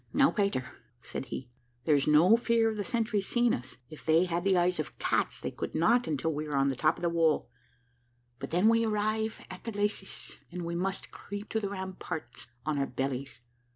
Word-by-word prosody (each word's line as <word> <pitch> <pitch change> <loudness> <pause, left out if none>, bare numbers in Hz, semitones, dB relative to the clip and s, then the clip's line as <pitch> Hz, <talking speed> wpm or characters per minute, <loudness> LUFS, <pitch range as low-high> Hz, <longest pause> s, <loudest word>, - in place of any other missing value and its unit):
"Now, 275 0 +5
Peter," 200 - 0 0.3
said 130 - -5
he, 125 -2 -6 0.3
"there 155 - +4
is 140 0 +3
no 160 +8 +7
fear 230 -1 +2
of - - -5
the 205 - -1
sentries 220 -4 0
seeing 240 -1 +3
us; 125 +1 -5
if 155 - -12
they 160 +3 +4
had 175 -1 -1
the 190 -1 +3
eyes 175 -1 +2
of 155 - -4
cats, - - 0
they - - -4
could - - -5
not 235 +9 +3
until 160 +1 0
we 150 +1 -3
are 150 - -2
on 135 0 +3
the 135 - -1
top 155 +5 +2
of - - -10
the 170 - +3
wall; 165 -2 +2 0.9
but - - -5
then 180 +6 +3
we 230 0 +5
arrive 215 0 0
at 185 - -9
the 230 - -4
glacis, 205 -1 -3
and 175 -1 -5
we 170 - -3
must 190 +3 -2
creep 205 +1 -7
to 220 - 0
the 200 -2 -2
ramparts 185 -10 -5 0.2
on 155 -2 0
our 135 - +1
bellies. 130 -1 -3
180 Hz, 215 wpm, -30 LUFS, 150-210 Hz, 0.9 s, no